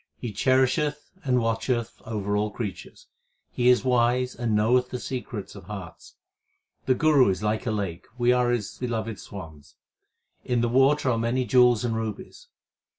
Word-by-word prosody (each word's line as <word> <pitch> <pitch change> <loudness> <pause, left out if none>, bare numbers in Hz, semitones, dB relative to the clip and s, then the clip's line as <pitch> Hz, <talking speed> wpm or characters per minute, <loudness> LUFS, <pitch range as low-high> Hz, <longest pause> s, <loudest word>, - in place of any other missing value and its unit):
He 120 - -5
cherisheth 130 +6 +1
and 125 -2 +2
watcheth 115 +1 -2
over 105 -2 -2
all 105 +1 0
creatures; 105 -2 -7 0.5
He 125 0 +2
is 125 -1 +4
wise 125 0 +2
and 115 -3 -1
knoweth 125 +4 +2
the 125 - -4
secrets 120 -5 -6
of 100 -3 -12
hearts. 95 -3 -9 0.7
The 130 - +4
Guru 150 -5 +4
is 95 +1 -2
like 110 +2 -1
a - - +1
lake; 100 -5 -4
we 120 0 +3
are 125 -1 +2
his 120 -4 -2
beloved 115 -3 -3
swans: 80 -7 -11 0.7
In 120 -1 0
the 120 - +1
water 135 +2 +3
are 115 - 0
many 120 +3 0
jewels 125 0 +4
and 115 -2 -1
rubies. 110 - -6
120 Hz, 160 wpm, -25 LUFS, 105-125 Hz, 0.7 s, is